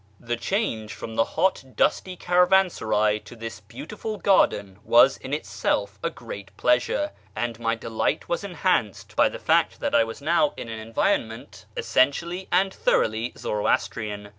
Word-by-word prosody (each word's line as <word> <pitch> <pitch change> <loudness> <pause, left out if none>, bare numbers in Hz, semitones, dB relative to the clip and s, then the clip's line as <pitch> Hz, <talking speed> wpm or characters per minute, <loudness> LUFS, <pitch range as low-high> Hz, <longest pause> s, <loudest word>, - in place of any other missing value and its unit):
The 120 0 -3
change 115 - -2
from 115 - -7
the 115 - +3
hot, 190 -5 +2
dusty 185 -1 +1
caravansaray 175 - +3
to - - -12
this 115 -1 -7
beautiful 220 -5 -7
garden 100 - +2
was 120 +3 +5
in 130 - -9
itself 100 -5 -2
a - - 0
great 100 -4 -10
pleasure, 125 - +1 0.2
and 115 +1 -3
my 115 0 0
delight 115 0 -2
was 170 - -2
enhanced 180 - -1
by - - +4
the - - -7
fact - - +2
that - - -2
I 115 - +5
was 115 0 -7
now 150 0 +2
in 115 - -6
an 110 -1 -5
environment 115 0 -2
essentially 170 +8 +1
and 190 +2 +2
thoroughly 110 +2 +1
Zoroastrian. 105 0 -2
115 Hz, 150 wpm, -25 LUFS, 110-180 Hz, 0.2 s, was